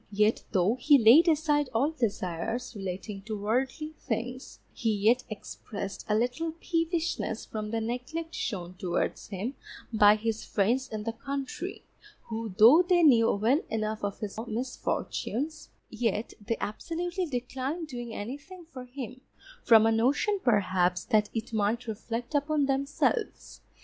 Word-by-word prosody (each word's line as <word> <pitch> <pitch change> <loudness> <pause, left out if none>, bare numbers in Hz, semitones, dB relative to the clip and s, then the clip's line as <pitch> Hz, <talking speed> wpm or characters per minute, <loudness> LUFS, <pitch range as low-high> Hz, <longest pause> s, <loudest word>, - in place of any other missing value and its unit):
Yet 210 +2 +2
though 195 +5 +2
he 290 +2 +7
laid 260 +9 +7
aside 295 -3 +2
all 275 +7 +3
desires 225 - -2
relating 195 +1 -5
to 215 -1 -4
worldly 260 +9 -1
things, 250 +2 -4 0.2
he 225 -2 0
yet 220 +5 +3
expressed 200 -2 -7
a 210 - +3
little 250 +9 0
peevishness 330 - -1
from 215 -1 -5
the 225 +1 -1
neglect 250 +9 -4
shown 180 - -3
towards 180 -1 -2
him 205 +6 -4 0.4
by 210 -1 +7
his 220 0 -2
friends 240 +7 +1
in 215 -1 -4
the 230 - -2
country, 275 +1 -5 0.5
who 225 -1 -4
though 240 +10 +9
they 355 -1 +3
knew 235 -7 +6
well 235 +10 +2
enough 215 -1 -2
of 200 -1 -2
his 210 0 -5
misfortunes, 255 +4 -3 0.2
yet 225 -1 -1
they 230 +2 -1
absolutely 345 - -3
declined 265 +5 -3
doing 240 -4 -6
anything 290 - -7
for 255 -1 -7
him, 255 0 -8 0.4
from 225 -2 +7
a 225 - +4
notion 275 - +2
perhaps 185 -5 +2
that 215 -4 +2
it 225 +1 -4
might 220 +3 0
reflect 230 +3 -5
upon 290 0 +2
themselves. 280 - -1
235 Hz, 140 wpm, -29 LUFS, 215-285 Hz, 0.5 s, though